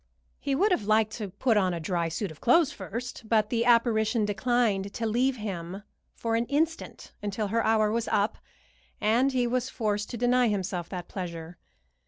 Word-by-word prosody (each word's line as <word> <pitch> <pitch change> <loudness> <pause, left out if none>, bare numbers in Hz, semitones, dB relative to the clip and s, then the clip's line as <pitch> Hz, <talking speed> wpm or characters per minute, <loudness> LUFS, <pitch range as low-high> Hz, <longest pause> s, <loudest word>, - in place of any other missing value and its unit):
He 275 - -1
would 395 +8 +3
have 230 - +1
liked 215 0 +3
to 210 -4 -4
put 225 +4 +1
on 185 -3 +2
a - - -4
dry 170 0 -1
suit 175 +3 -3
of 155 - -14
clothes 295 +4 +4
first, 240 -4 -7
but 215 -2 +2
the 235 -1 +1
apparition 230 -2 +3
declined 205 -2 0
to 230 - -2
leave 250 +4 +1
him 195 -3 -5 0.3
for 225 -1 -1
an 230 +1 0
instant 320 +3 -2
until 205 0 -2
her 230 +2 +1
hour 215 -1 +3
was 230 0 -1
up, 205 +1 0 0.6
and 240 +6 +3
he 250 -2 +1
was 250 +1 -1
forced 210 -3 -2
to 240 - -5
deny 245 +1 +3
himself 190 -4 -2
that 180 -2 -6
pleasure. 170 -2 -7
220 Hz, 185 wpm, -27 LUFS, 200-245 Hz, 0.6 s, clothes